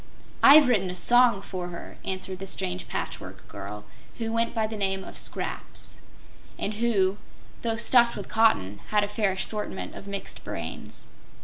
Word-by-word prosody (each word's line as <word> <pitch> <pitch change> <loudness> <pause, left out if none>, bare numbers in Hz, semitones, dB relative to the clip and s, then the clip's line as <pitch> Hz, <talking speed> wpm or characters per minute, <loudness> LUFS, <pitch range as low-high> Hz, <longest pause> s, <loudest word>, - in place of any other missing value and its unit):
"I've 290 0 +9
written 200 -7 +2
a 180 - -5
song 240 0 +5
for 180 -2 -5
her," 170 -1 -9
answered 185 0 -4
the 195 - -6
strange 90 - -3
Patchwork - - -6
Girl, 100 +1 -8 0.3
who 225 -1 -3
went 230 +1 0
by 220 -1 +2
the 220 0 -5
name 195 -2 0
of - - -10
"Scraps," - - -4 0.6
and 210 - -2
who, 205 -3 +1 0.4
through 225 -1 -1
stuffed 235 0 +4
with 200 - -6
cotton, 105 - +2
had 210 -1 +2
a - - 0
fair 210 -2 0
assortment 210 +2 -2
of 195 - -10
mixed 200 0 -6
brains. - - -7
205 Hz, 165 wpm, -27 LUFS, 185-230 Hz, 0.6 s, I've